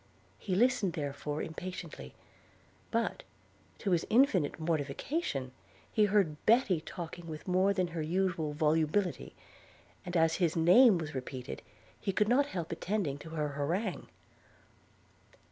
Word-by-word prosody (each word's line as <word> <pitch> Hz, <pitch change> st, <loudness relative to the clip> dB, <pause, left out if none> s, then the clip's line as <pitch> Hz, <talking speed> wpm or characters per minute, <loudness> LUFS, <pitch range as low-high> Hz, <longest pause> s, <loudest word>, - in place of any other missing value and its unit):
He 185 Hz, -, -2 dB
listened 240 Hz, -4 st, +2 dB
therefore 145 Hz, -1 st, -3 dB
impatiently; 165 Hz, -, -7 dB, 0.7 s
but, -, -, -1 dB, 0.6 s
to 195 Hz, -, -2 dB
his 170 Hz, -2 st, +2 dB
infinite 210 Hz, -, +3 dB
mortification, 150 Hz, -, -2 dB, 0.4 s
heard 200 Hz, -8 st, +2 dB
Betty 215 Hz, -7 st, +4 dB
talking 170 Hz, 0 st, -7 dB
with 155 Hz, +1 st, -8 dB
more 185 Hz, +2 st, +3 dB
than 185 Hz, -3 st, 0 dB
her 165 Hz, -1 st, -4 dB
usual 170 Hz, -2 st, 0 dB
volubility; 160 Hz, +5 st, 0 dB, 0.7 s
and 180 Hz, -2 st, -2 dB
as 160 Hz, 0 st, +3 dB
his 170 Hz, -4 st, +1 dB
name 185 Hz, +6 st, +6 dB
was 160 Hz, -2 st, -5 dB
repeated, 130 Hz, 0 st, -6 dB, 0.4 s
he 195 Hz, -, -1 dB
could 210 Hz, +2 st, +1 dB
not 280 Hz, +4 st, +4 dB
help 170 Hz, -, -5 dB
attending 180 Hz, -9 st, -2 dB
to 160 Hz, -, -10 dB
her 155 Hz, -2 st, -2 dB
harangue. 170 Hz, +8 st, -2 dB
170 Hz, 125 wpm, -31 LUFS, 155-195 Hz, 0.7 s, name